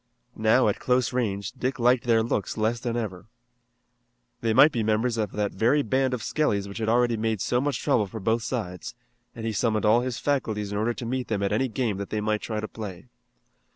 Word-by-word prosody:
Now 110 Hz, +3 st, +3 dB
at 105 Hz, -, 0 dB
close 125 Hz, 0 st, +1 dB
range, 105 Hz, -4 st, -1 dB
Dick 130 Hz, +2 st, -3 dB
liked 125 Hz, 0 st, +3 dB
their 115 Hz, -2 st, +3 dB
looks 110 Hz, -3 st, -2 dB
less 110 Hz, +2 st, 0 dB
than 120 Hz, 0 st, -2 dB
ever. 105 Hz, -4 st, -5 dB, 1.1 s
They 115 Hz, -, 0 dB
might 135 Hz, +7 st, +7 dB
be 120 Hz, -, -1 dB
members 110 Hz, +2 st, +1 dB
of 110 Hz, -2 st, -1 dB
that 105 Hz, -1 st, -1 dB
very 125 Hz, +9 st, +2 dB
band 130 Hz, +2 st, +1 dB
of 120 Hz, -, -7 dB
Skelly's 105 Hz, -10 st, 0 dB
which 100 Hz, +3 st, -7 dB
had 110 Hz, -1 st, -1 dB
already 120 Hz, 0 st, +3 dB
made 110 Hz, -1 st, -1 dB
so 125 Hz, +6 st, +1 dB
much 140 Hz, -4 st, -1 dB
trouble 120 Hz, -8 st, +2 dB
for 110 Hz, +3 st, -7 dB
both 110 Hz, +3 st, +1 dB
sides, 110 Hz, -3 st, -4 dB, 0.4 s
and 115 Hz, -2 st, -6 dB
he 110 Hz, -, -1 dB
summoned 110 Hz, 0 st, 0 dB
all 110 Hz, +3 st, +5 dB
his 125 Hz, -2 st, -3 dB
faculties 110 Hz, -8 st, -1 dB
in 100 Hz, -, -2 dB
order 115 Hz, +2 st, 0 dB
to 120 Hz, -, -6 dB
meet 125 Hz, +1 st, -2 dB
them 100 Hz, -3 st, -1 dB
at 100 Hz, -, 0 dB
any 130 Hz, +5 st, +1 dB
game 115 Hz, -4 st, -1 dB
that 100 Hz, 0 st, -5 dB
they 110 Hz, -, -2 dB
might 105 Hz, 0 st, 0 dB
try 110 Hz, -2 st, -3 dB
to 110 Hz, -, -4 dB
play. 105 Hz, -1 st, -8 dB
115 Hz, 220 wpm, -26 LUFS, 105-125 Hz, 1.1 s, might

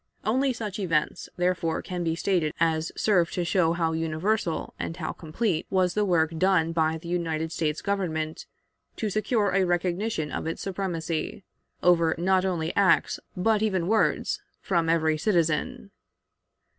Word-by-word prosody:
Only 260 Hz, +5 st, +2 dB
such 220 Hz, -4 st, -5 dB
events, 165 Hz, -6 st, -1 dB
therefore, 175 Hz, -2 st, 0 dB
can 180 Hz, -1 st, -4 dB
be 165 Hz, -1 st, 0 dB
stated 170 Hz, -4 st, 0 dB
as 160 Hz, -1 st, +1 dB
serve 180 Hz, -6 st, +3 dB
to 180 Hz, -, -1 dB
show 170 Hz, -1 st, +2 dB
how 165 Hz, -1 st, 0 dB
universal 165 Hz, +3 st, -1 dB
and 165 Hz, -, -4 dB
how 160 Hz, -3 st, -3 dB
complete 165 Hz, +1 st, -2 dB
was 185 Hz, -2 st, +2 dB
the 210 Hz, -, +1 dB
work 165 Hz, -4 st, +2 dB
done 180 Hz, -3 st, +3 dB
by 160 Hz, -1 st, +1 dB
the 165 Hz, +1 st, -11 dB
United 165 Hz, -2 st, -1 dB
States 155 Hz, -2 st, -2 dB
Government 160 Hz, -6 st, -2 dB, 0.5 s
to 215 Hz, -2 st, -2 dB
secure 215 Hz, 0 st, +1 dB
a 195 Hz, 0 st, +3 dB
recognition 175 Hz, -1 st, -1 dB
of -, -, -3 dB
its 165 Hz, -, -4 dB
supremacy, 175 Hz, -3 st, -3 dB, 0.4 s
over 170 Hz, -2 st, +4 dB
not 185 Hz, +2 st, +2 dB
only 170 Hz, -4 st, -1 dB
acts 200 Hz, -2 st, +3 dB, 0.2 s
but 210 Hz, +3 st, +2 dB
even 190 Hz, -6 st, 0 dB
words, 220 Hz, +2 st, +1 dB, 0.2 s
from 170 Hz, -3 st, 0 dB
every 160 Hz, -1 st, +2 dB
citizen. 200 Hz, +6 st, 0 dB
175 Hz, 150 wpm, -26 LUFS, 160-195 Hz, 0.5 s, over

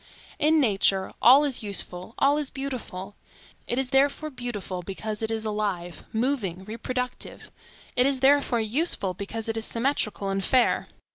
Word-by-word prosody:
In 310 Hz, +2 st, +4 dB
nature, 195 Hz, -6 st, +2 dB
all 260 Hz, +5 st, +8 dB
is 275 Hz, -4 st, -1 dB
useful, 200 Hz, -1 st, -2 dB
all 285 Hz, +2 st, +3 dB
is 290 Hz, -3 st, -3 dB
beautiful. 240 Hz, -8 st, -6 dB, 0.5 s
It 240 Hz, -, 0 dB
is 265 Hz, -1 st, 0 dB
therefore 285 Hz, +3 st, +2 dB
beautiful 220 Hz, -8 st, -5 dB
because 210 Hz, +4 st, -4 dB
it 220 Hz, -, -1 dB
is 225 Hz, -1 st, -1 dB
alive, 200 Hz, -5 st, -3 dB
moving, 220 Hz, -7 st, -1 dB
reproductive; 250 Hz, +4 st, -5 dB, 0.4 s
it 250 Hz, +1 st, +5 dB
is 275 Hz, -1 st, +1 dB
therefore 270 Hz, -3 st, +4 dB
useful 220 Hz, -, +2 dB
because 210 Hz, +4 st, -5 dB
it 225 Hz, 0 st, -2 dB
is 220 Hz, -, 0 dB
symmetrical 230 Hz, -5 st, -1 dB
and 195 Hz, 0 st, -1 dB
fair. 250 Hz, +5 st, +2 dB
225 Hz, 150 wpm, -26 LUFS, 200-270 Hz, 0.5 s, all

